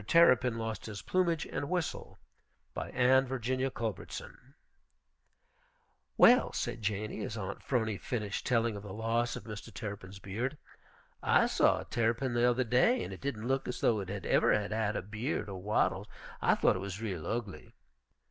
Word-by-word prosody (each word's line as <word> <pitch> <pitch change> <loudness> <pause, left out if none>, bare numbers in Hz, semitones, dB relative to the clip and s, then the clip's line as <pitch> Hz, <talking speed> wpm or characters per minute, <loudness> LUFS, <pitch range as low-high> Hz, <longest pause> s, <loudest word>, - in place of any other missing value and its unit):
TERRAPIN 125 -8 +5
LOST 110 -1 -4
HIS 100 -3 -7
PLUMAGE 170 - +1
AND 140 - -4
WHISTLE 180 -3 -3 0.6
BY - - -4
ANNE 130 +1 +4
VIRGINIA 130 +1 -1
CULBERTSON 115 - -6 1.6
"Well," 250 +2 +7
said 120 -1 -3
Janey, 105 +1 -2
as 110 - -4
Aunt 100 -1 -5
'Phrony 110 -6 -1
finished 105 -5 -3
telling 115 -3 +2
of 100 - -6
the 100 -1 -8
loss 115 +2 0
of - - -7
Mr. 105 -2 -8
Terrapin's 100 -3 -7
beard, 115 +9 -3 0.6
"I - - +4
saw - - +3
a - - -9
terrapin 120 +2 0
the 120 +1 +4
other 125 +1 +2
day, 130 - +3
and - - -6
it - - -10
didn't 120 -5 -3
look 135 +1 0
as 125 - -4
though 110 -3 +3
it 95 -2 -5
ever 100 -2 +2
had 105 0 +1
had 110 -1 0
a - - -2
beard 105 - -3
or 95 -2 -6
wattles. 105 +3 +1 0.3
I - - +4
thought - - +3
it - - -4
was 100 0 -5
real 95 -8 -4
ugly." 110 -4 -4
115 Hz, 170 wpm, -32 LUFS, 105-125 Hz, 1.6 s, Well